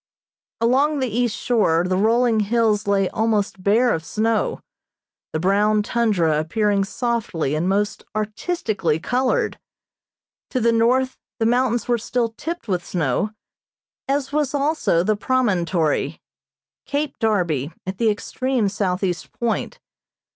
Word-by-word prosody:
Along 270 +6 +2
the 260 -2 0
east 240 -2 0
shore 190 -9 +2
the 185 - +1
rolling 225 +3 +3
hills 215 -1 +1
lay 195 -1 +2
almost 215 -3 0
bare 225 +6 +3
of 160 - -2
snow, 220 +5 0 0.7
the 155 - -2
brown 205 +4 +2
tundra 200 -10 +1
appearing 200 +5 +1
softly 210 - -2
and 160 +4 0
most 205 +2 0
artistically 215 - -1
colored. 250 +8 0 0.9
To 255 - -1
the 235 0 +3
north 250 +3 +2 0.2
the 225 - 0
mountains 240 -1 +1
were 240 -1 +2
still 235 +1 -1
tipped 320 +7 -6
with 180 -3 -1
snow, 165 +3 -1 0.8
as 275 0 -1
was 295 -2 0
also 285 - +1
the 215 +3 +2
promontory 190 - 0 0.7
Cape 290 0 -2
Darby, 175 - 0
at 190 +1 -5
the 230 -2 +3
extreme 240 +1 -1
southeast 185 -3 -2
point. 235 -1 -2
215 Hz, 125 wpm, -22 LUFS, 190-245 Hz, 0.9 s, rolling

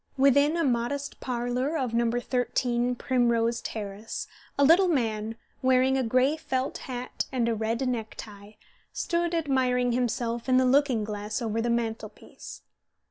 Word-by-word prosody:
Within 285 +3 +4
the 335 - +1
modest 270 +2 -1
parlour 250 +4 -1
of 255 -5 -2
No. 235 0 +2
13 245 0 0
Primrose 235 -2 +1
Terrace 210 0 -5 0.3
a 280 - +4
little 340 +6 +6
man, 225 -8 -1 0.3
wearing 260 +1 +3
a 265 - +2
gray 255 +5 +2
felt 265 -4 -2
hat 250 0 -4
and 245 -3 0
a 235 - +1
red 225 +4 -1
neck 225 -4 -3
tie, 205 0 -11 0.3
stood 340 0 -1
admiring 255 -5 +1
himself 240 0 -1
in 255 - +5
the 260 - +4
looking 260 -3 +3
glass 210 0 -4
over 225 -2 -1
the 240 - -1
mantelpiece. 230 -1 -5
245 Hz, 145 wpm, -27 LUFS, 230-265 Hz, 0.3 s, little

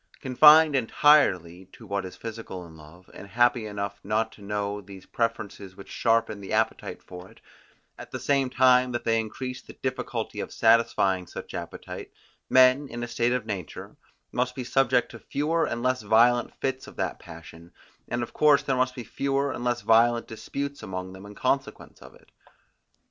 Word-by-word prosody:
Confined 150 +3 +6
entirely 105 - +3
to 115 - -13
what 100 -1 -3
is 90 - -9
physical 110 -5 -8
in 80 -1 -14
love, 80 +4 -16
and 100 - -11
happy 120 0 +2
enough 100 -1 -5
not 110 +2 -1
to - - -17
know 105 0 -3
these 95 -1 -13
preferences 105 -4 -4
which 100 - -13
sharpen 115 -3 +1
the 95 - -6
appetite 110 +1 -1
for 90 0 -11
it, - - -20 0.6
at - - -9
the - - -6
same 140 -2 +1
time 125 0 +4
that 120 - -3
they 115 0 +2
increase 125 +3 -5
the - - -13
difficulty 130 -1 -3
of - - -5
satisfying 95 -5 +2
such - - -9
appetite, - - -7 0.4
men, 130 +2 +5
in 120 -1 -6
a - - -3
state 120 0 0
of 125 -3 -2
nature, 100 -6 -7 0.4
must 125 0 -1
be 130 - -4
subject 125 -1 +1
to 115 - -10
fewer 160 +7 -1
and 120 0 -4
less 130 -1 +1
violent 120 +3 +3
fits 130 0 -3
of - - -12
that - - -3
passion, 85 0 -13 0.4
and 120 0 -2
of - - -8
course 150 -2 +4
there 135 - 0
must 130 0 0
be 125 - -6
fewer 140 +4 -1
and 120 - -6
less 120 -1 0
violent 115 +1 +3
disputes 140 +5 -6
among 95 0 -6
them 95 +1 -11
in 105 - -12
consequence 135 +4 -2
of - - -14
it. - - -23
115 Hz, 180 wpm, -26 LUFS, 100-130 Hz, 0.6 s, Confined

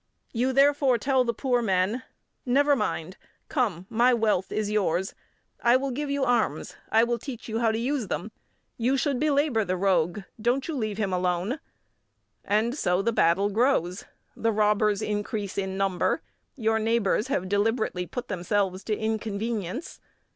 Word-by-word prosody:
You, 250 +2 +1
therefore, 275 -1 +4
tell 265 +2 +2
the 235 - 0
poor 245 +1 0
men: 195 +3 +1 0.4
"Never 285 +3 +3
mind. 185 -6 -3 0.3
Come, 210 - -1
my 240 +3 +3
wealth 210 -5 +1
is 215 -1 -1
yours, 190 -3 0 0.5
I 240 +1 +5
will 270 +1 -2
give 290 +3 -3
you 280 -1 0
arms, 245 -3 0
I 225 +1 +4
will 235 0 0
teach 250 -1 -8
you 225 0 -2
how 230 -2 +3
to 220 - -1
use 250 -1 -1
them; 195 +4 -4 0.5
you 250 +4 +1
should 275 -2 0
belabour 285 -6 +2
the 185 -2 -2
rogue; 180 0 +1 0.2
don't 245 +4 +1
you 325 - -3
leave 215 -7 -2
him 200 -4 -1
alone." 180 - 0 0.8
And 220 +5 +1
so 180 -9 +1
the 230 +2 +1
battle 195 +2 +3
grows; 205 -6 +1 0.3
the 230 - 0
robbers 210 -1 +2
increase 205 -1 -3
in 190 -1 -2
number; 195 -2 0 0.3
your 220 -4 +1
neighbours 220 0 +1
have 225 -9 -1
deliberately 205 -2 0
put 245 -1 -5
themselves 190 0 -1
to 215 -2 -1
inconvenience. 220 - -3
220 Hz, 160 wpm, -26 LUFS, 195-250 Hz, 0.8 s, I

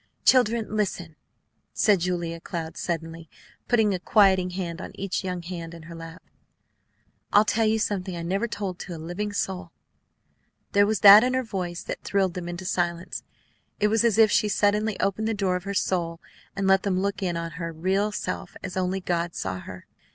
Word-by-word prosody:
"Children, 230 -4 +3
listen!" 180 -6 -2 0.6
said 205 -3 +3
Julia 170 -1 -2
Cloud, 165 -1 -5
suddenly 165 -1 -4 0.4
putting 220 -4 +3
a 185 - -2
quieting 190 -1 +4
hand 180 -1 -4
on - - -8
each 195 0 -3
young 180 -2 -4
hand 170 -1 -6
in 165 - -11
her 170 +1 -10
lap. 165 +1 -10 1.1
"I'll 210 +1 +6
tell 225 +1 +2
you 220 +1 +2
something 190 -4 -2
I 170 - -5
never 195 +7 -1
told 200 -5 -4
to 175 - -6
a - - -7
living 175 +6 -4
soul." 190 -3 -3 1.0
There 205 0 +4
was 215 -3 0
that 205 +2 +10
in 255 +1 +1
her 260 - +1
voice 180 -6 -4
that - - -5
thrilled 195 -3 +1
them 180 -2 -5
into 175 +2 -6
silence. 175 -1 -2 0.6
It 210 - +3
was 225 +2 +2
as 230 -2 +3
if 220 -2 +6
she 210 - +3
suddenly 210 +1 +1
opened 205 +3 0
the 225 - 0
door 195 -3 0
of 180 +1 -4
her 200 0 -3
soul 170 -3 -1 0.4
and 195 - -1
let 190 0 +5
them 190 -2 0
look 200 +1 -2
in 175 -3 -1
on 165 0 -4
her 165 0 -3
real 190 +6 0
self - - -4
as 185 - -5
only 185 +1 -1
God 170 -1 -2
saw 95 -1 -3
her. 90 0 -10
185 Hz, 195 wpm, -25 LUFS, 170-205 Hz, 1.1 s, that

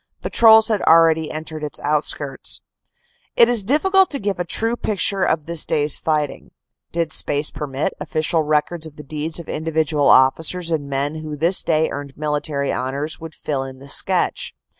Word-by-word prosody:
Patrols 220 -1 +5
had 215 -3 0
already 160 -1 +4
entered 155 0 -7
its 150 - -6
outskirts." 145 -2 -1 0.7
It 235 - +6
is 240 -4 +2
difficult 375 - +3
to 285 - -2
give 200 -3 -3
a - - 0
true 225 +7 -1
picture 200 -3 -1
of 160 -5 0
this 170 -1 +1
day 150 - 0
s 150 - +5
fighting. 150 -3 -2 0.4
Did 165 -2 -2
space 145 +1 +2
permit, 145 +5 -3
official 160 +1 -1
records 155 +2 -1
of 155 - -14
deeds 155 +2 -3
of 170 - -10
individual 155 -2 0
officers 165 +6 +3
and 145 -3 -2
men 140 +3 -2
who 155 -1 -7
this 170 +5 +3
day 160 -1 +1
earned 140 -1 -7
military 150 -1 -2
honors 140 +5 -3
would 160 -1 -10
fill 140 -3 -3
in 135 0 -9
the 135 +1 -13
sketch. - - +1
155 Hz, 170 wpm, -20 LUFS, 145-170 Hz, 0.7 s, It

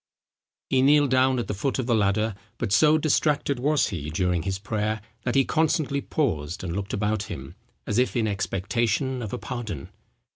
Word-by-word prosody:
He 130 - +4
kneeled 145 0 +5
down 130 0 +4
at 120 - -2
the - - -2
foot 115 +8 -1
of 130 - -1
the 120 - +1
ladder; 105 +1 +2 0.2
but 115 -5 -3
so 150 +10 +5
distracted 145 -3 +1
was 145 +3 +2
he 75 -6 -4
during 90 +2 0
his 95 +2 -2
prayer, 110 +1 -2 0.3
that 120 - 0
he 135 -1 +4
constantly 155 -3 +1
paused 85 - -2
and 85 -2 -3
looked 100 0 -4
about 105 0 -1
him, 65 0 -7 0.3
as 105 +2 0
if 125 - +1
in 115 -3 +1
expectation 115 +6 -1
of 110 -4 -5
a - - -3
pardon. 115 - -5
115 Hz, 185 wpm, -25 LUFS, 100-135 Hz, 0.3 s, kneeled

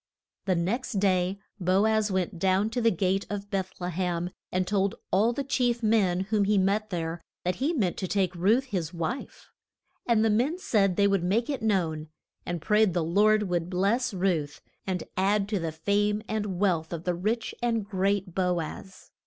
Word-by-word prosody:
The 190 -2 +2
next 230 +10 -1
day 190 -1 +1 0.2
Bo 185 +3 +3
az 220 -1 +2
went 185 -1 -2
down 190 +4 +2
to 245 +1 -1
the 230 - +5
gate 190 0 0
of 205 0 -5
Beth 190 -2 -3
le 180 0 -3
hem, 175 0 -2 0.2
and 185 0 0
told 195 0 0 0.2
all 210 +5 +3
the 275 +4 -3
chief 245 -3 0
men 200 -5 +3
whom 205 +1 +1
he 205 +1 +2
met 200 +3 +1
there 165 -2 -3 0.2
that 180 0 0
he 285 +5 +1
meant 210 - 0
to 195 +2 -2
make 185 -2 +2
Ruth 205 +9 +3
his 185 - -4
wife. 170 +11 -5 0.6
And 225 -2 +3
the 220 - +3
men 255 +11 +1
said 210 - +1
they 200 +1 +4
would 195 -3 +1
make 225 +9 +1
it 275 - -3
known, 170 -8 0 0.4
and 175 -2 -3
prayed 210 -3 +3
the 175 - +1
Lord 210 +6 +3
would 175 -3 -1
bless 200 +7 +1
Ruth 175 -7 -1 0.3
and 180 -3 -1
add 200 +1 +2
to 210 -3 0
the 165 -1 -2
fame 205 +6 0
and 210 -4 -2
wealth 170 -5 +1
of 165 -1 -5
the 180 - 0
rich 215 +6 -2
and 230 -3 0
great 195 -2 -1
Bo 180 -1 +1
az. 185 +4 -8
195 Hz, 195 wpm, -27 LUFS, 180-215 Hz, 0.6 s, the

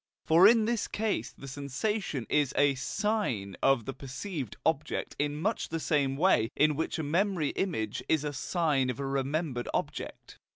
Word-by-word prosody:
For 170 +4 +7
in 225 -1 +5
this 235 -1 0
case 205 - -2
the 135 - -9
sensation 140 - -2
is 145 -3 +1
a 145 -1 +4
SIGN 135 - -1
of 130 -5 +3
the 135 - -4
perceived 135 - -6
object 150 -1 -1
in 145 0 0
much 215 +7 -1
the 165 - -2
same 140 -4 +1
way 150 -10 +3
in 150 0 +3
which 160 - -2
a 160 - -2
memory 170 0 +1
image 110 - -2
is 155 -2 +2
a 150 -1 -3
sign 145 -2 0
of 125 - -3
a 140 - -2
remembered 135 -1 -2
object. - - -5
145 Hz, 170 wpm, -30 LUFS, 135-175 Hz, -, For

